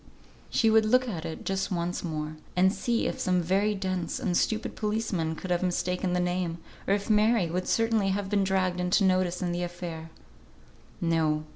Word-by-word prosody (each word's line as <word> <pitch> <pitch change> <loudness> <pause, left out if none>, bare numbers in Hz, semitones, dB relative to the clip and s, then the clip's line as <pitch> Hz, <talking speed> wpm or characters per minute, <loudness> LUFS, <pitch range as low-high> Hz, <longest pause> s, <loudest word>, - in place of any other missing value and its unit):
She 225 -1 +3
would 220 0 +5
look 255 +3 +3
at 175 -7 -4
it 160 -1 -6
just 195 0 -1
once 175 0 -2
more, 155 -2 -4 0.2
and 190 +2 +4
see 235 0 0
if - - -2
some 180 -1 +2
very 195 +5 +1
dense 185 -3 -2
and 175 - -1
stupid 220 +4 0
policeman 210 -7 -1
could 180 +3 -6
have 175 - +2
mistaken 180 0 -1
the 180 - +1
name, 180 -1 -1 0.3
or 195 - +4
if 200 0 -4
Mary 215 -4 +3
would 180 +1 -2
certainly 225 -3 +2
have 195 0 -1
been 200 0 +1
dragged 185 -2 +1
into 180 +3 +2
notice 185 -1 +2
in 175 - 0
the 175 0 -2
affair. 175 -2 -5 0.9
No! 160 -2 +1
185 Hz, 185 wpm, -28 LUFS, 175-205 Hz, 0.9 s, would